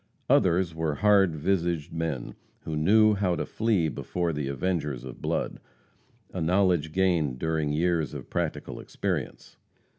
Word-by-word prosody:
Others 90 -1 +3
were 80 -2 -1
"hard 100 -4 +4
visaged 85 -1 -1
men," 80 -6 -3 0.3
who 80 - -4
knew 105 +7 +5
how 95 -3 +1
to - - -2
flee 105 -7 +1
before 85 +3 -2
the 75 -2 -3
avengers 75 -3 -2
of 65 -2 -9
blood - - -2 0.7
a 90 - -3
knowledge 90 -2 +2
gained 85 -7 +1
during 80 0 -1
years 80 0 0
of - - -7
practical - - -3
experience. - - -4
85 Hz, 140 wpm, -27 LUFS, 75-95 Hz, 0.7 s, knew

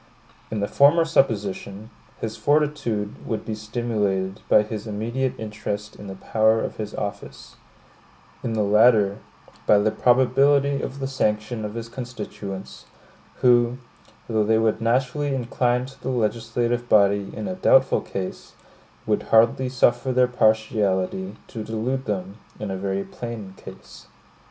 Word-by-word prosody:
In 110 -2 -3
the 100 - 0
former 150 +7 +5
supposition, 105 - -1 0.3
his 110 -1 -4
fortitude 145 -9 0
would 110 - -4
be 110 - -3
stimulated 105 -3 -2
by 105 - +6
his 105 0 -6
immediate 115 +5 -2
interest 105 -1 -5
in 105 - -10
the 95 - -7
power 110 +3 +2
of - - -4
his 105 -1 -5
office; 100 -1 -6 0.9
in 115 - -2
the 110 -1 +1
latter, 105 -1 +4 0.5
by 105 - +6
the 105 +1 +2
probability 140 +4 +3
of 135 - -5
the 135 -1 -3
sanction 110 -3 -1
of 105 +1 -5
his 115 0 -5
constituents, 115 -6 -7 0.6
who, 120 -1 +4 0.5
though 110 -2 +1
they 110 +1 +3
would 110 0 +1
naturally 130 +4 0
incline 125 0 0
to 135 +1 -14
the 130 - -3
legislative 120 0 -1
body 100 -1 +4
in - - -4
a 185 - -2
doubtful 135 -7 +4
case, 95 -1 -6 0.5
would - - +1
hardly 115 +3 +4
suffer 125 0 +2
their 125 0 +4
partiality 110 - +1
to 115 -4 -7
delude 115 +5 -2
them 100 0 -4 0.2
in 105 -2 -4
a - - -2
very 95 +1 -2
plain 115 -5 -7
case. - - -13
110 Hz, 140 wpm, -23 LUFS, 105-125 Hz, 0.9 s, by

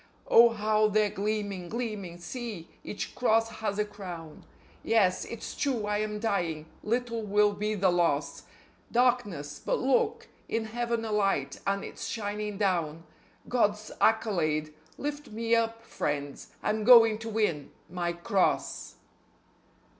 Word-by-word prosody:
Oh, 235 +1 +8
how 215 -1 +2
they're 210 -1 +2
gleaming, 205 -3 -2
gleaming! 210 -7 -4
See! 205 -2 -6
Each 205 - -5
cross 225 -2 +2
has 205 -2 -1
a 210 - +1
crown. 180 -6 -9 0.4
Yes, 200 -5 +2
it's 230 - -7
true 255 -7 0
I 210 0 0
am 210 0 -2
dying; 175 -8 -1 0.2
little 230 +1 -1
will 210 0 +3
be 210 +1 -2
the 190 -2 +3
loss.... 170 -5 0 0.5
Darkness... 210 - +1
but - - +1
look! 260 0 +1 0.2
In 225 0 -1
Heaven 235 0 -2
a 220 - -3
light, 205 -2 0
and 195 0 0
it's - - -6
shining 210 -1 -3
down.... 170 -6 0 0.4
God's 210 -3 +1
accolade! 160 -9 +2 0.2
Lift 290 0 -4
me 230 +1 -1
up, 230 0 +1
friends. 145 -6 -3 0.2
I'm 215 0 0
going 225 -2 +8
to 225 0 -6
win 210 -10 -1 0.2
_MY 175 -1 -1
CROSS. 200 -5 0
210 Hz, 135 wpm, -29 LUFS, 185-225 Hz, 0.5 s, Oh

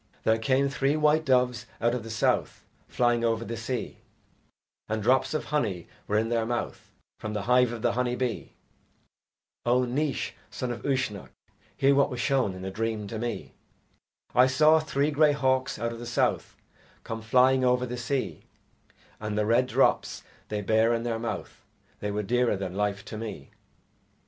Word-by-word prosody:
There 110 0 +3
came 130 +5 +2
three 140 +2 0
white 150 +1 +3
doves 125 -3 +2
out 120 +1 +2
of 125 - -2
the 115 - -9
South 110 - 0 0.2
Flying 120 -1 +1
over 115 0 0
the 115 - -4
sea, 115 +2 -4 0.9
And 110 -1 -1
drops 130 +6 +2
of 155 - -2
honey 105 - -1 0.2
were 105 - +1
in 110 +1 +1
their 115 -1 +1
mouth 120 +1 -4 0.3
From 110 -1 -5
the 105 -2 -2
hive 125 +1 +4
of 120 -1 -6
the 120 - +3
honey 125 0 0
bee. 125 -3 -3 1.1
O 125 +1 +3
Naois, 135 +2 -1 0.2
son 125 - -4
of 120 - -5
Uisnech, 130 -8 -1 0.5
hear 140 +1 +4
What 140 0 +3
was 125 - -5
shown 130 -9 +1
in 95 0 -7
a 95 - -4
dream 110 0 -2
to 110 - -4
me. 120 0 -4 0.8
I 125 +1 +6
saw 155 +4 +5
three 150 -1 0
grey 150 0 +4
hawks 130 -2 +1
out 115 0 -2
of 115 - -8
the 120 - -7
South 115 - 0 0.5
Come 115 0 -5
flying 130 +3 +4
over 125 0 +2
the 125 0 -5
sea, 125 +2 -3 0.7
And 105 -1 -3
the 105 - +2
red 120 +4 +3
drops - - +1 0.2
they 105 -1 -3
bare 110 +3 +3
in 115 - -3
their 115 -1 -2
mouth 115 0 -5 0.4
They 105 - -3
were 105 +1 -2
dearer 120 0 +1
than 95 -2 -4
life 100 0 -2
to 110 - -7
me. 105 -11 -7
120 Hz, 180 wpm, -27 LUFS, 110-130 Hz, 1.1 s, I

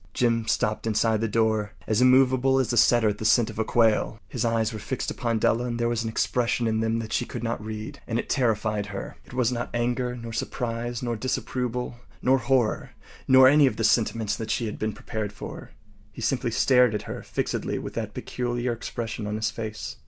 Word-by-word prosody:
Jim 115 -2 +1
stopped 110 -1 0
inside 110 0 +2
the 115 - +1
door, 110 -1 +1
as 110 +2 +1
immovable 130 +1 +5
as 125 -3 +1
a - - +1
setter 120 -1 +5
at 105 - -3
the - - -4
scent 115 +1 +3
of 110 0 -3
quail. 110 -1 +2
His 120 - -3
eyes 115 -1 +1
were 110 - -5
fixed 130 +5 -3
upon 115 -3 -1
Della, 115 +2 +2
and 120 -1 -3
there 120 - +1
was 120 -1 0
an 115 - -2
expression 120 +1 0
in 110 -1 +1
them 115 0 0
that 115 -1 -4
she - - +1
could 120 - -6
not 115 -2 -2
read, 110 0 -6
and 115 - -1
it - - -3
terrified 110 -5 0
her. 100 -1 -7
It - - -12
was 125 -2 +2
not 120 -1 -3
anger, 125 +1 -1
nor 115 -1 -7
surprise, 120 +1 -3
nor 120 -1 -1
disapproval, 125 0 -3 0.2
nor 130 +1 +3
horror, 130 -5 0 0.3
nor 130 0 +8
any 145 +1 +6
of 120 - -1
the 115 - -1
sentiments 110 -2 +2
that 110 -1 -5
she 120 - 0
had 105 - -5
been 110 0 -1
prepared 110 -3 -4
for. 105 - -8 0.4
He - - -10
simply - - 0
stared 125 -4 +4
at - - -3
her - - -6
fixedly - - -2
with - - -6
that - - -4
peculiar 120 0 -2
expression 115 -2 -5
on 105 - -2
his 110 0 -1
face. 110 -2 -6
115 Hz, 210 wpm, -26 LUFS, 110-125 Hz, 0.4 s, nor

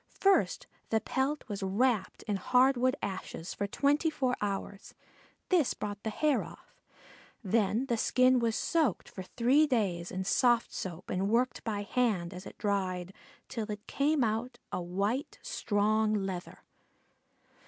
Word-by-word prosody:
First 395 0 +3 0.2
the 220 - +2
pelt 265 +7 -1
was 205 -3 -5
wrapped 200 +1 0
in 205 -2 -1
hardwood 255 +4 +3
ashes 190 -2 -5
for 200 - -2
twenty 290 +8 +2
four 260 -5 0
hours. 200 0 -4 0.5
This 345 -8 +3
brought 205 -1 -5
the 220 - -2
hair 295 +5 +1
off. - - -13 0.7
Then 220 +4 +1
the 235 -3 0
skin 255 +2 +4
was 230 -2 +1
soaked 315 - +1
for - - -8
three 255 +10 +3
days 190 -10 0
in 185 +1 -3
soft 240 +4 +2
soap 180 -1 -6
and 190 +2 0
worked 245 +3 +1
by 205 -3 -2
hand, 200 -6 0
as 180 +1 -8
it - - -12
dried, 190 -3 -1 0.3
till 220 -2 -4
it 210 +1 -6
came 285 0 +1
out 225 +3 -1
a - - -2
white 200 +10 -2
strong 215 - +1
leather. 190 -3 -4
220 Hz, 145 wpm, -31 LUFS, 195-255 Hz, 0.7 s, skin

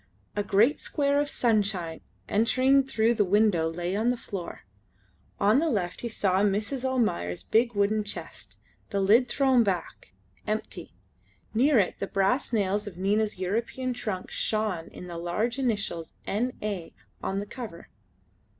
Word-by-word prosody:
A 205 - +1
great 210 +7 +3
square 285 -1 +1
of 290 0 0
sunshine 200 -8 0 0.3
entering 255 +6 +3
through 230 -3 +2
the 215 -3 +2
window 195 -4 +3
lay 175 +3 -3
on 220 +4 +1
the 245 - +1
floor. 190 -6 -6 0.8
On 210 +6 +4
the 325 +1 +1
left 180 -8 -2
he 235 - -3
saw 190 -4 +1
Mrs. 210 +6 0
Almayer's 215 - 0
big 235 +1 +2
wooden 205 +1 +2
chest, 205 - -8 0.3
the 200 - -1
lid 220 +6 +5
thrown 265 -3 +3
back, 190 -4 -3 0.3
empty; 215 +1 -4 0.6
near 265 +5 +4
it 195 -4 +2
the 195 - -2
brass 195 +10 +1
nails 205 -1 0
of 185 -4 -8
Nina's 205 +3 +1
European 230 +7 -2
trunk 210 -6 -4
shone 215 -6 -1
in - - -10
the 170 -1 -6
large 210 +9 -1
initials 205 -10 -2
N. 245 +5 -1
A. 200 -6 -4 0.3
on 195 +1 -2
the 205 - -4
cover. 215 -6 -9
210 Hz, 150 wpm, -27 LUFS, 190-240 Hz, 0.8 s, lid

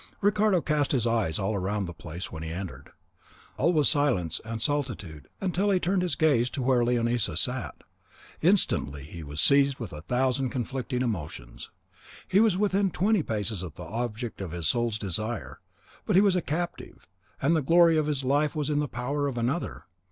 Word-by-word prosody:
Ricardo 205 -2 +3
cast 150 -2 0
his 125 -4 +1
eyes 115 -9 +1
all 100 +2 -1
round 100 +2 -1
the 85 - -6
place 85 +2 -7
when 80 - -7
he 80 - -4
entered; 90 +2 -6 0.7
all 170 - +2
was 150 -5 +3
silence 95 - +2
and 115 0 -5
solitude 110 - -3 0.3
till 200 +3 +1
he 190 -2 +3
turned 185 +1 +1
his 180 -1 -1
gaze 135 -7 +3
to 130 - -4
where 125 -1 +3
Leonisa 120 -6 +1
sat. 110 - -3 0.6
Instantly 115 - +2
he 80 +3 -9
was 75 0 -6
seized 140 - +4
with 110 -7 -6
a 75 - -7
thousand 130 - 0
conflicting 125 0 -2
emotions. 80 - -5 0.6
He 190 - +3
was 215 -4 +4
within 200 -1 +2
twenty 200 +3 +2
paces 105 - -2
of 85 -5 -7
the 90 - -8
object 115 +4 -4
of 95 - -4
his 85 -3 -2
soul's 120 +2 +1
desire; 110 +3 -3 0.5
but - - +2
he 190 - +7
was 195 -3 +4
a 180 - +2
captive, 170 +4 -4 0.3
and 165 - +2
the 160 - +2
glory 165 +3 +5
of 155 -1 +1
his 145 -3 -1
life 145 +3 +1
was 150 -1 -1
in 145 - +1
the 150 - 0
power 140 +4 -2
of 130 -3 -4
another. 125 +9 -2
125 Hz, 190 wpm, -27 LUFS, 100-155 Hz, 0.7 s, he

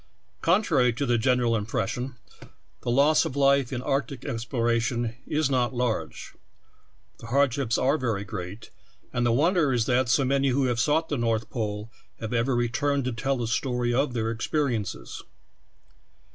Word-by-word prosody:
Contrary 150 - +3
to 125 +5 -2
the 120 -2 +2
general 125 0 +2
impres 115 0 -1
sion, 125 +2 -4 0.7
the - - -4
loss 140 +5 +4
of 130 - -4
life 140 -2 +3
in 125 -1 -3
arctic 135 -1 -2
exploration 115 0 -1
is 155 -1 +1
not 130 -2 0
large. 120 -2 -2 0.9
The 115 - -10
hardships 130 -2 +1
are 140 +4 +2
ver}^ 110 -5 -1
great, 95 +2 -7 0.4
and 120 0 +1
the - - +3
wonder 155 +3 +3
is 120 -3 +1
that 125 -1 +1
so 135 +2 +3
many 140 +1 +2
who 135 +1 +2
ha^^e 120 -2 0
sought 155 +6 +1
the 145 - -1
North 115 -1 -1
Pole 105 -2 -4 0.3
have 110 +1 -4
ever 120 +2 +1
returned 130 +3 0
to 130 - -1
tell 135 +4 -1
the 120 - -2
story 120 +1 0
of 135 +1 +1
their 115 -1 0
experiences. 115 - -2
125 Hz, 160 wpm, -26 LUFS, 115-140 Hz, 0.9 s, loss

